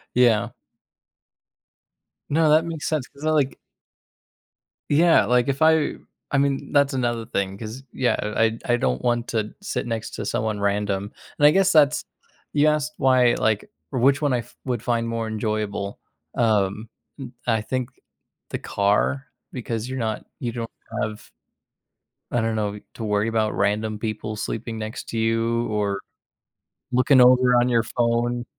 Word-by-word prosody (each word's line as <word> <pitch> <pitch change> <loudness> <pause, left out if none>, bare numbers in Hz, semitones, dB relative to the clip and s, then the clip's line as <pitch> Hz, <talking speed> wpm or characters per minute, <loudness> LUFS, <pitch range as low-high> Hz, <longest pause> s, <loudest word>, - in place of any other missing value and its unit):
Yeah. 120 -4 +4 1.8
No, 155 +1 +3
that 155 +2 +5
makes 160 -4 -4
sense, 155 -5 -1
'cause 140 +2 -11
I 155 - +2
like 145 -4 +1 1.3
Yeah, 165 -5 +5
like 125 +2 +2
if 140 +2 -1
I 160 -1 +4 0.4
I 140 - +2
mean, 140 -1 0
that's 140 -1 +3
another 120 -3 -1
thing, 100 -2 -2
'cause, 115 +5 -7
yeah, 130 -2 +1
I 105 +2 +1
I 115 0 -1
I - - +3
don't 65 - 0
want 120 0 0
to 110 -2 -2
sit 205 - -3
next 115 -2 -3
to 105 - -5
someone 110 0 -1
random, 100 0 -1 0.3
and 145 - +4
I - - +7
guess 190 +2 +3
that's 150 -3 +4 0.5
You 150 +1 +4
asked 150 0 +1
why, 130 -3 +4
like, 110 -1 0 0.2
which 135 +3 +3
one 145 -3 +2
I 125 - +1
f 120 +1 -11
would 125 -4 -2
find 115 -2 0
more 115 -1 -2
enjoyable, 105 -2 -3 0.4
um, 105 -2 +1 0.3
m 130 -3 -7 0.2
I 110 -2 +2
think 125 +2 -3 0.6
the - - -3
car, 105 +7 0 0.3
because 115 -2 -4
you're 130 0 -4
not 110 -2 -2
you 120 - -2
don't 115 -1 -5 0.3
have 110 0 -5 1.0
I 120 - +1
don't 115 0 0
know, 105 -1 0
w 105 - -9
to 115 - -6
worry 105 +1 +1
about 110 -1 0
random 105 +1 0
people 110 -1 -4
sleeping 115 +1 -4
next 110 +3 -6
to 115 - -4
you, 115 +1 +1
or 100 -2 -1 0.9
looking 130 +2 +4
over 125 0 +6
on 120 - +2
your 115 -2 +3
phone. 120 +1 0
115 Hz, 160 wpm, -23 LUFS, 110-130 Hz, 1.8 s, I